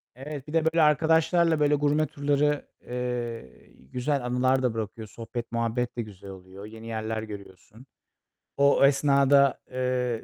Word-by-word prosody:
Evet, 140 +1 -8
bir 150 - -8
de 165 -1 +2
böyle, 160 +1 +3
arkadaşlarla 160 +2 +3
böyle 150 0 +3
gurme 150 +1 +1
turları, 145 +1 0 0.2
eee, 120 - -5 0.2
güzel 130 +1 -1
anılar 130 +2 +1
da 125 -3 +1
bırakıyor. 110 0 -5
Sohbet, 115 +2 -7
muhabbet 115 +1 -2
de - - 0
güzel 100 -3 -11
oluyor. 95 +1 -11
Yeni 110 +1 -11
yerler 110 0 -3
görüyorsun. 105 +2 -11 0.7
O 140 0 +5
esnada, 140 -1 +4
eee, 125 -2 -1
125 Hz, 140 wpm, -26 LUFS, 115-145 Hz, 0.7 s, O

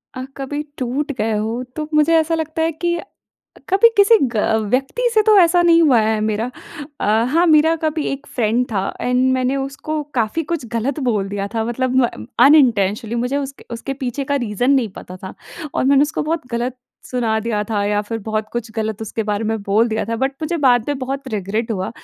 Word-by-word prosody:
अ, 255 - -5
कभी 290 +2 -4 0.2
टूट 270 +4 -2
गए 225 0 0
हो, 225 +4 -2
तो 305 -1 -4
मुझे 305 +2 +4
ऐसा 325 +1 0
लगता 320 0 -3
है 325 - +1
कि 345 +2 -2 0.7
कभी 390 +5 +6
किसी 405 +3 +6 0.2
ग 225 - -4 0.3
व्यक्ति 270 - -1
से 435 - +5
तो 425 -1 +5
ऐसा 350 -1 +5
नहीं 335 -1 +5
हुआ 275 -7 +5
है 220 0 +1
मेरा। 215 +3 -1 0.5
अ, - - -1 0.3
हाँ, 340 +3 +4
मेरा 320 0 +5
कभी 310 -1 -1
एक 275 +2 -7
फ्रेंड 235 +1 +1
था 195 -3 0 0.2
एंड 250 0 +1
मैंने 260 +1 0
उसको 275 +3 -3
काफ़ी 235 +6 0
कुछ 310 -8 -3
गलत 245 +5 -1
बोल 205 -4 0
दिया 200 0 -3
था, 225 -1 0
मतलब 250 +2 -1
म 240 - -3 0.2
अनइंटेंशनली। 225 -7 +3
मुझे 250 +4 -1
उसके 275 -1 -5
उसके 255 +4 -5
पीछे 260 +2 -2
का 285 +1 0
रीज़न 215 +5 0
नहीं 260 -5 +2
पता 185 - -9
था 190 0 -9 0.4
और - - 0
मैंने 275 +1 +5
उसको 295 - -1
बहुत 315 -2 -2
गलत 240 +2 -2 0.3
सुना 230 -3 0
दिया 215 -2 -1
था 205 -2 0
या 205 0 +1
फिर 225 +2 -4
बहुत 215 0 -2
कुछ 240 -1 -4
गलत 220 -1 -2
उसके 220 +1 -3
बारे 210 0 -2
में 220 0 -1
बोल 210 +4 +2
दिया 220 -1 -1
था 230 - -1
बट 265 +3 0
मुझे 330 +2 -1
बाद 245 -5 +3
में 290 -2 -1
बहुत 270 +1 -4
रिग्रेट 215 +3 -2
हुआ 190 -4 -2
250 Hz, 205 wpm, -19 LUFS, 220-300 Hz, 0.7 s, कभी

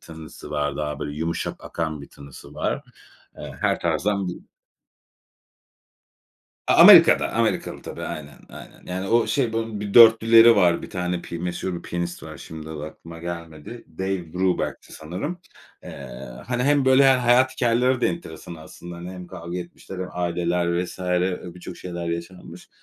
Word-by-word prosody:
tınısı 80 -2 -11
var. 75 -1 -1
Daha 75 -2 -3
böyle 75 0 -5
yumuşak 80 +1 -2
akan 80 -2 -4
bir 70 - -11
tınısı 70 0 -13
var. - - -2 0.6
Eee, - - -7
her - - +1
tarzdan 100 -2 0
bir - - -4 2.3
A - - +4
Amerika'da. - - +8
Amerikalı, - - -1
tabii. - - -8
Aynen. 75 -3 -7
Aynen. - - -13
Yani, 95 +2 -4
o 115 +2 +3
şey, 125 -6 0
bunun 115 -2 -3
bir 100 -1 -5
dörtlüleri 115 0 +8
var. 90 -3 +3
1 - - -9
tane 90 -1 -3
pi 85 - -7
meşhur 90 0 -4
piyanist 85 0 -4
var. - - -9
Şimdi, 80 -1 -9
adı 75 -1 -6
aklıma 85 +1 -11
gelmedi. 85 +5 -8
Dave 95 -4 -3
Brubeck'ti 90 0 -1
sanırım. 95 - -5 0.4
Eee, - - -9 0.2
hani, 125 0 -1
hem 145 -1 +3
böyle 130 +1 +6
he - - +6
hayat 125 +1 +4
hikâyeleri 125 +1 +1
de - - +3
enteresan 170 - -6
aslında. 85 +2 -11
Hani, 85 +1 -8
hem 90 -1 -9
kavga 85 +1 -7
etmişler 90 +1 -9
hem 90 0 -4
aileler 85 0 0
vs. 90 - -9
Eee, 90 0 0
birçok 90 0 -9
şeyler 85 -1 -5
yaşanmış. 85 +2 -7
90 Hz, 160 wpm, -23 LUFS, 85-105 Hz, 2.3 s, Amerika'da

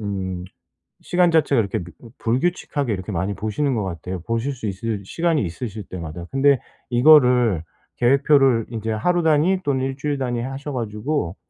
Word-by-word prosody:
음 95 -3 -4 0.6
시간 175 -1 +3
자체가 145 -6 +3
이렇게 100 -2 -1 0.2
뭐 115 - -14
불규칙하게 140 0 -1
이렇게 95 +1 -4
많이 95 +3 -1
보시는 120 +7 -1
것 105 - -1
같아요, 90 +1 -5
보실 115 +6 -2
수 125 -4 -6
있을 100 +1 -4
시간이 165 - 0
있으실 100 +4 -5
때마다. 85 -1 -7
근데 135 -1 +4 0.3
이거를 125 - +5 0.4
계획표를 135 -2 +4
인제 110 -1 -4
하루 175 +11 +1
단위 160 +5 +3
또는 130 -2 0
1 135 0 -3
주일 145 0 -2
단위 120 -3 -2
하셔 135 +4 -5
가지고 110 - -2
120 Hz, 350 characters per minute, -22 LUFS, 100-140 Hz, 0.6 s, 이거를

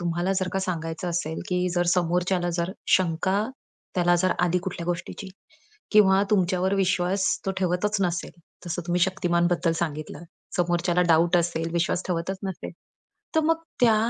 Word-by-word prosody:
तुम्हाला 175 +2 0
जर 185 -1 0
का 195 - 0
सांगायचं 165 -1 -3
असेल, 165 -2 -2
की 180 0 +1
जर 175 - +2
समोरच्याला 175 0 +1
जर 170 +1 -1 0.2
शंका 185 +3 +1 0.5
त्याला 175 -1 +3
जर 185 +1 +2
आली 180 0 +2
कुठल्या 180 -3 -5
गोष्टीची 175 +3 -4 0.6
किंवा 195 -2 +6
तुमच्यावर 190 -1 +2
विश्वास 185 0 +1 0.2
तो - - +2
ठेवतच 190 +3 0
नसेल. 175 -1 -1 0.4
तसं 175 +1 -3
तुम्ही 175 +1 0
शक्तिमान 175 -2 +2
बद्दल 170 -1 +1
सांगितलं 155 -1 -4 0.3
समोरच्याला 175 0 +2
डाऊट 170 +2 +4
असेल, 165 -1 0
विश्वास 175 +1 0
ठेवतच 180 +2 -2
नसेल 190 -2 -5 0.6
तर 320 - +4
मग 325 +1 +3 0.2
त्या 225 -3 +5
180 Hz, 150 wpm, -25 LUFS, 170-190 Hz, 0.6 s, किंवा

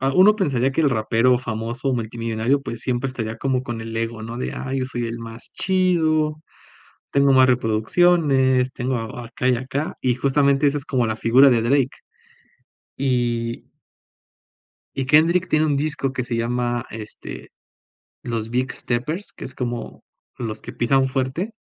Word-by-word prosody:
ah, 135 +1 +1
uno 210 +3 +6
pensaría 135 - +1
que 165 - 0
el 145 -3 +3
rapero 115 +2 +2
famoso, 120 +2 -3
multimillonario, 115 +3 -1
pues, 115 -4 -6
siempre 125 +1 -1
estaría 115 -3 -4
como 130 0 0
con 120 -2 -5
el 115 0 -6
ego, 115 -1 -3
¿no?, 115 +2 -6
de: 125 - -3
"Ay, 135 0 -3
yo - - 0
soy 120 -2 -3
el 115 +1 -5
más 115 0 -8
chido, 160 -5 +1 0.8
tengo 140 0 +4
más 130 0 +6
reproducciones, 130 +2 +3
tengo 125 0 -2
acá 120 +2 -4
y 125 - +4
acá", 135 +5 -3
y 125 -2 +1
justamente 140 +1 +2
esa 145 +1 +1
es 140 - -6
como 125 -3 +1
la 110 - -1
figura 130 +5 +5
de 115 -2 +3
Drake. 130 +2 +1 1.0
Y 120 -3 -1 1.3
y 135 -1 -1
Kendrick 170 +5 +4
tiene 155 -1 +2
un 145 - +1
disco 140 -2 -1
que 130 - -2
se 120 -1 -3
llama, 120 0 -1
este, 110 -1 -8 0.8
Los 115 -2 -3
Big 125 +2 -1
Steppers, 150 +11 -3
que - - -9
es 130 - -5
como 120 -2 -5 0.4
los 115 -3 -5
que - - -8
pisan 130 +2 +2
fuerte. 135 - -2
130 Hz, 165 wpm, -22 LUFS, 115-140 Hz, 1.3 s, uno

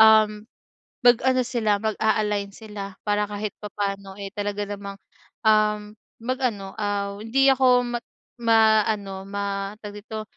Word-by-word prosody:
um, 215 -1 +6 0.6
mag-ano 255 +1 +5
sila 225 -5 0
mag-a-align 210 -2 0
sila. 205 -3 -8
Para 210 0 +1
kahit 210 0 -4
papano 200 -1 -4
eh, 200 -1 -6
talaga 205 0 -2
namang, 200 -1 -6 0.4
um, 210 -1 +2 0.2
mag 255 +2 -2
ano 200 -6 -2
aw, 200 -1 -2
hindi 265 +6 +3
ako 255 -2 +5
ma 240 - -1 0.4
ma 220 -2 +5
ano 195 -3 -3
ma 200 0 -3
tawag 210 -1 -7
dito? 215 +1 -6
210 Hz, 135 wpm, -24 LUFS, 200-220 Hz, 0.6 s, um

